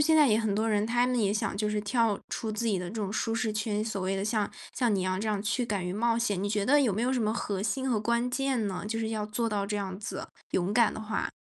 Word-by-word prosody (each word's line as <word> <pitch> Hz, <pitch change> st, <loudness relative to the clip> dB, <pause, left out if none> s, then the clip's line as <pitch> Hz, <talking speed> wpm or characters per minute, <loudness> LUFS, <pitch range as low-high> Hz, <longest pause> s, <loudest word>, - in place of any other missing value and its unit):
现 320 Hz, -, +5 dB
在 300 Hz, -2 st, +7 dB
也 215 Hz, -, +4 dB
很 220 Hz, -3 st, 0 dB
多 220 Hz, +2 st, +1 dB
人， 210 Hz, 0 st, +2 dB
他 240 Hz, +2 st, +2 dB
们 250 Hz, -1 st, +1 dB
也 205 Hz, -3 st, +2 dB
想 215 Hz, -2 st, -1 dB
就 210 Hz, +1 st, 0 dB
是 210 Hz, 0 st, 0 dB
跳 215 Hz, 0 st, +1 dB
出 220 Hz, -, -3 dB
自 215 Hz, +2 st, -2 dB
己 205 Hz, -4 st, +2 dB
的 180 Hz, -, -4 dB
这 205 Hz, -, -8 dB
种 205 Hz, -2 st, -2 dB
舒 225 Hz, +1 st, 0 dB
适 220 Hz, -1 st, 0 dB
圈， 215 Hz, 0 st, -1 dB
所 210 Hz, -3 st, -3 dB
谓 190 Hz, +1 st, 0 dB
的 195 Hz, -, -1 dB
像 210 Hz, -1 st, +1 dB, 0.2 s
像 240 Hz, -4 st, +1 dB
你 195 Hz, -, +1 dB
一 -, -, 0 dB
样 185 Hz, +1 st, -1 dB
这 220 Hz, -, -2 dB
样 210 Hz, -2 st, 0 dB
去 240 Hz, +3 st, 0 dB
敢 200 Hz, -5 st, -1 dB
于 180 Hz, -, -2 dB
冒 230 Hz, +3 st, +1 dB
险。 210 Hz, -5 st, 0 dB
你 205 Hz, -, 0 dB
觉 205 Hz, -1 st, 0 dB
得 290 Hz, +6 st, +5 dB
有 245 Hz, -7 st, +3 dB
没 215 Hz, -, -1 dB
有 255 Hz, +2 st, +2 dB
什 260 Hz, -, +1 dB
么 215 Hz, 0 st, +1 dB
核 200 Hz, -4 st, -2 dB
心 260 Hz, +6 st, -1 dB
和 225 Hz, -, +2 dB
关 235 Hz, +3 st, +1 dB
键 260 Hz, -4 st, 0 dB
呢？ 190 Hz, +1 st, -4 dB
就 225 Hz, +1 st, -2 dB
是 220 Hz, -, -1 dB
要 215 Hz, -1 st, -2 dB
做 230 Hz, +2 st, -1 dB
到 205 Hz, -2 st, -1 dB
这 210 Hz, 0 st, -2 dB
样 190 Hz, -2 st, -4 dB
子， 210 Hz, -, -5 dB, 0.2 s
勇 185 Hz, +2 st, +1 dB
敢 230 Hz, 0 st, +4 dB
的 -, -, -5 dB
话。 215 Hz, 0 st, -2 dB
215 Hz, 330 characters per minute, -29 LUFS, 205-230 Hz, 0.2 s, 在